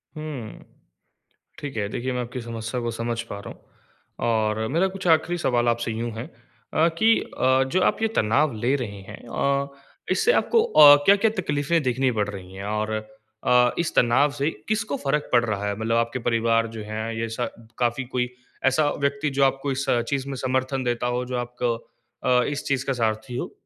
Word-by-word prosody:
हुँ, 150 -8 -7 1.0
ठीक 140 -5 -6
है। 105 -2 0
देखिए 130 +4 -3
मैं 125 - -1
आपकी 125 +1 -5
समस्या 115 +1 -4
को 120 0 -2
समझ 115 +1 -3
पा 100 - -5
रहा - - -6
हूँ - - -24 0.7
और 110 -1 0
मेरा 170 +9 +2
कुछ 190 -1 -5
आख़िरी 165 +2 +3
सवाल 120 -7 +1
आपसे 120 0 -1
यूँ 115 +1 -3
है 115 - -4 0.5
अ, 160 - +4
कि 225 +1 +6
अ, 130 +1 +1
जो 185 - +2
आप - - +1
ये 225 - +3
तनाव 130 +7 +2
ले 120 +5 +1
रहे 105 -7 -5
हैं - - -9
अ, 140 +3 0 0.4
इससे 450 +1 +3
आपको 460 -2 +3
अ, 150 - +9
क्या-क्या 205 +2 +5
तकलीफ़ें 150 +1 0
देखनी 130 0 +1
पड़ 105 -3 0
रही 95 -2 -9
हैं? 95 - -7
और 105 +1 -2
अ, 110 +3 0
इस 170 - -1
तनाव 130 +5 +4
से 140 +3 +2 0.2
किसको 215 -9 -1
फ़र्क 145 +2 0
पड़ 120 -1 +5
रहा 105 -2 -2
है 100 - -1
मतलब 115 +1 0
आपके 115 +2 0
परिवार 115 -1 +1
जो - - -5
है, 110 +2 -4
ये 115 0 -2
स 115 - -6 0.4
काफ़ी 120 +1 +1
कोई 125 0 -2 0.4
ऐसा 145 +3 +3
व्यक्ति 140 +1 0
जो 140 - +4
आपको 135 +1 +1
इस 135 +1 -2 0.2
चीज़ 140 -2 -1
में 135 - -4
समर्थन 130 +1 -1
देता 120 0 -1
हो 125 +1 -1
जो 125 0 -3
आपको 120 0 -1 0.5
अ, 125 -1 +4
इस 145 +2 -3
चीज़ 135 -1 0
का 135 - 0
सारथी 115 +1 -2
हो? - - -4
125 Hz, 195 wpm, -24 LUFS, 115-140 Hz, 1.0 s, अ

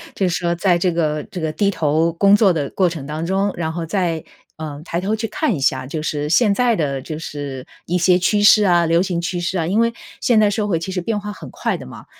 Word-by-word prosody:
就 190 -2 +1
是 175 - -1
说 170 -1 -1
在 175 0 +2
这 180 +1 +1
个 155 -2 0
这 180 - -7
个 160 - -1
低 200 +6 +1
头 165 -2 +1
工 200 +4 +4
作 205 -3 +5
的 145 -4 -2
过 185 -2 +1
程 160 -5 -7
当 155 +3 -4
中， 195 +3 0
然 160 -1 -2
后 170 -1 -4
再， 170 -3 -1 0.3
呃， 150 -2 -7
抬 170 - -2
头 200 +3 -1
去 225 - -2
看 310 - -1
一 160 - -3
下。 130 -1 0
就 155 +4 -4
是 150 -1 -2
现 205 +4 +4
在 245 -3 +2
的 140 -4 -1
就 155 +3 -6
是 140 -4 -6 0.2
一 180 +2 +1
些 180 +1 +4
趋 205 +3 +1
势 210 +1 +7
啊， 175 -3 +3
流 165 +1 +3
行 180 -2 -1
趋 175 +1 -3
势 175 +2 -2
啊。 165 -2 -1
因 210 +5 +2
为 230 0 +1 0.3
现 235 -3 +3
在 210 -1 +4
社 205 +1 -1
会 175 -6 0
其 185 +3 -5
实 180 - -2
变 210 +3 -2
化 210 0 -6
很 - - -11
快 - - -2
的 - - -8
嘛， - - -11
175 Hz, 285 characters per minute, -20 LUFS, 160-200 Hz, 0.3 s, 势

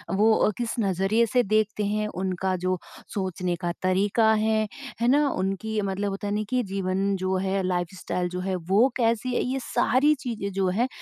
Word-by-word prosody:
वो 215 +3 +5
अ, - - +3
किस 240 -2 -2
नज़रिए 195 +3 +2
से 250 -1 +4
देखते 215 0 +1
हैं, 210 +1 0
उनका 185 -1 -2
जो 185 0 +1 0.4
सोचने 185 -2 -2
का 175 - +1
तरीका 200 +4 +3
है, 215 0 +1 0.3
है 235 - +3
ना? 290 +3 +4
उनकी, 195 +2 -2
मतलब 200 +1 -2
होता 195 +1 -4
है 205 - -1
ना 215 - 0
कि 255 0 +1
जीवन 195 +1 0
जो 185 0 -1
है, 195 +1 0
लाइफ़स्टाइल 180 0 -2
जो 180 +1 -4
है, 185 +1 -2
वो 190 +7 +3
कैसी 235 +1 +1
है, - - +2
ये 260 +2 -1
सारी 260 +5 +3
चीज़ें 215 -5 -4
जो 195 -1 +1
है 225 +7 +1
200 Hz, 190 wpm, -26 LUFS, 185-220 Hz, 0.4 s, वो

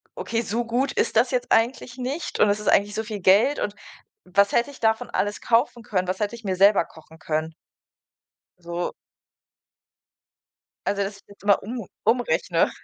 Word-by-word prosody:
„Okay, 230 0 -2
so 235 +2 -2
gut 250 +4 0
ist 230 - 0
das 245 +2 +4
jetzt 250 -2 -1
eigentlich 240 +2 +1
nicht 265 +6 -4
und 210 - +6
es 205 +1 +1
ist 210 - -7
eigentlich 205 +1 +3
so 220 - -1
viel 215 -3 -5
Geld 210 +11 +4
und 205 - -2 0.5
was 200 +2 +3
hätte 245 +5 +1
ich - - -14
davon 220 -1 +1
alles 205 0 -1
kaufen 235 0 +1
können? 185 -4 -1
Was 185 - -2
hätte 210 +1 -1
ich 235 - -13
mir 190 -2 -2
selber 200 0 +5
kochen 160 0 -17
können?“ 155 +1 -2 1.1
So. 170 0 -4 1.9
Also, 200 0 0
dass 195 0 -5
ich 200 - -21
das 200 - -16
immer 205 -1 +3
um 230 +1 -5 0.2
umrechne. 195 -7 +2
210 Hz, 180 wpm, -24 LUFS, 195-235 Hz, 1.9 s, und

